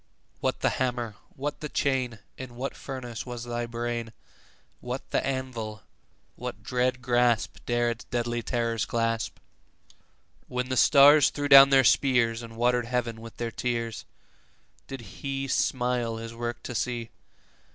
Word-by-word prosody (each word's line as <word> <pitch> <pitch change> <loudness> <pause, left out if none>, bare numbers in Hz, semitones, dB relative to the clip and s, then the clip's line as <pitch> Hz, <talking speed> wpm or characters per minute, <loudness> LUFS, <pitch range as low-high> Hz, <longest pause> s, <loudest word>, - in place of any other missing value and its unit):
What - - -1
the - - +2
hammer? 120 -3 -1 0.2
what 145 +2 -4
the 150 - -5
chain? 130 -5 0 0.2
In 130 -2 -9
what 130 +3 -4
furnace 120 -4 -6
was 120 -2 -6
thy 120 0 -3
brain? 115 -1 -4 0.7
What 125 +2 -5
the - - +1
anvil? 120 -5 -4 0.5
What - - -7
dread 125 0 0
grasp 120 -2 +2
15 - - -25
Dare 120 0 +2
its 115 - -7
deadly 120 0 -2
terrors 115 -2 -1
clasp? 115 -1 -1 1.1
When 125 0 -3
the 130 - 0
stars 145 +2 +7
threw 145 0 -3
down 135 -1 +10
their 135 -1 +6
spears, 120 -3 +3
And 115 -1 -10
water'd 120 0 +2
heaven 120 -2 -2
with 115 0 -11
their 120 -1 -3
tears, 115 -3 -3 0.8
Did 135 -2 -7
He 135 +5 -5
smile 125 -3 0
His 115 0 -7
work 120 0 -5
to - - -5
see? 120 0 -2
120 Hz, 150 wpm, -27 LUFS, 115-130 Hz, 1.1 s, down